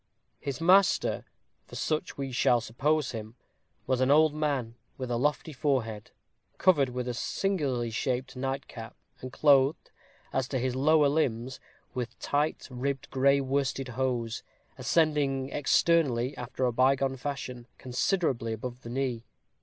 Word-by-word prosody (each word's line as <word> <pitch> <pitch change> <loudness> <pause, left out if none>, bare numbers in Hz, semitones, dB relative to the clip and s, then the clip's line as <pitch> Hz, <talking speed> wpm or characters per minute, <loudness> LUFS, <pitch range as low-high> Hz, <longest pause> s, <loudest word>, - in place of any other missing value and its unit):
His 140 -2 -4
master, 185 +3 +3 0.4
for - - -11
such 155 -1 -2
we 135 -1 -4
shall 125 -1 +3
suppose 135 +6 0
him, 110 0 -7 0.5
was 130 0 0
an 130 - +3
old 155 +1 +5
man 140 -7 -1 0.2
with 130 -2 -4
a - - +1
lofty 150 +5 0
forehead, 120 -7 -1 0.5
covered 150 -8 +4
with 125 0 -4
a 125 - -1
singularly 135 -6 -1
shaped 130 +2 -2
nightcap, 135 -3 -5 0.2
and 130 - -7
clothed, 140 +1 +3 0.4
as 130 -1 0
to 130 - -2
his 130 0 -1
lower 150 +2 +4
limbs, 130 -4 -1 0.3
with 125 -1 -4
tight, 145 +2 -1
ribbed, 135 +2 -3
gray 140 +1 +4
worsted 135 -1 -1
hose, 120 -2 -2 0.3
ascending 145 -5 +1
externally, 145 -4 +2
after 125 +1 -3
a 125 - +1
bygone 135 +2 +2
fashion, 125 -3 -5
considerably 125 - 0
above 120 +3 -6
the 115 - -9
knee. 125 -2 -2
130 Hz, 140 wpm, -29 LUFS, 125-145 Hz, 0.5 s, old